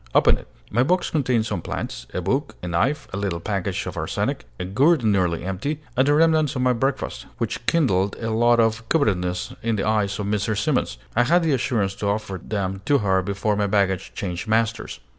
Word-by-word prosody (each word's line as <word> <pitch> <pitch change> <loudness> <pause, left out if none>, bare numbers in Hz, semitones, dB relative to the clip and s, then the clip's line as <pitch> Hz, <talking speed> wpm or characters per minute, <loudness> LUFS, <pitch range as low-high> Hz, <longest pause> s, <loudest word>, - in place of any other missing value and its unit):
Open - - +6
it!" - - -11 0.2
My 120 - +2
box 175 +8 +1
contained 125 -7 +1
some 105 -6 -3
plants, - - -5
a 90 - -3
book, 135 - -1
a - - -3
knife, 135 - 0
a - - -2
little 95 -4 -2
package 100 0 -2
of - - -5
arsenic, - - -2
a - - -3
gourd 135 - +3
nearly 90 -6 +1
empty, 95 - -3 0.2
and 130 +2 +3
the 145 - +4
remnants 155 -2 +3
of 125 - 0
my 125 0 +4
breakfast, 135 +3 -2
which - - -3
kindled 100 - +2
a 115 -1 -2
look 120 +1 +4
of 115 0 +1
covetousness 90 - 0
in 115 -1 0
the 95 - -1
eyes 105 -2 +1
of 105 - -3
Mrs. 105 +1 0
Simons. 100 - 0 0.2
I 120 +2 +4
had 175 +5 +4
the 160 -3 +2
assurance 110 -6 0
to 100 - -2
offer 100 -3 -2
them 95 -2 -3
to 145 +2 +4
her 95 -5 +2
before 100 +2 -1
my 100 0 +1
baggage 95 -2 +1
changed 90 -1 -4
masters. 115 +1 0
110 Hz, 205 wpm, -23 LUFS, 95-130 Hz, 0.2 s, Open